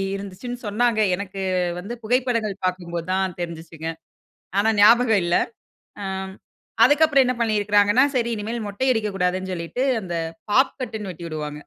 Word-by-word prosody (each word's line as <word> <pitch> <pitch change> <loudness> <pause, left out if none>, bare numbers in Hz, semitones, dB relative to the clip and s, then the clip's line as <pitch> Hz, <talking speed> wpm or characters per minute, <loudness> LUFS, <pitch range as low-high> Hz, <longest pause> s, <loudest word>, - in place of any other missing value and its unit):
இருந்துச்சுன்னு 200 +5 -6
சொன்னாங்க. 225 +2 +1 0.2
எனக்கு 195 0 -7 0.4
வந்து 200 +6 -6
புகைப்படங்கள் 230 -3 0
பாக்கும்போது 175 -2 -3
தான் 190 -2 0
தெரிஞ்சுச்சுங்க. 165 -1 -6 0.7
ஆனா 210 - +3
ஞாபகம் 225 0 +6
இல்ல. 175 0 +2 0.7
ஆம், 190 0 -4 0.5
அதுக்கப்பறம் 290 -2 +5
என்ன 250 0 0
பண்ணியிருக்கிறாங்கன்னா, 210 +1 +3
சரி 235 -1 +1
இனிமேல் 220 +1 -4
மொட்டை 205 +6 -1
அடிக்கக்கூடாதுன் 190 -4 -1
சொல்லிட்டு 175 +9 -3 0.2
அந்த 175 -2 -4 0.4
பாப் 265 +5 +3
கட் 230 -3 -4
ன்னு 205 -2 -6
வெட்டி 170 0 -9
உடுவாங்க. 150 -1 -5
ஆ, - - -39
205 Hz, 140 wpm, -23 LUFS, 180-235 Hz, 0.7 s, ஞாபகம்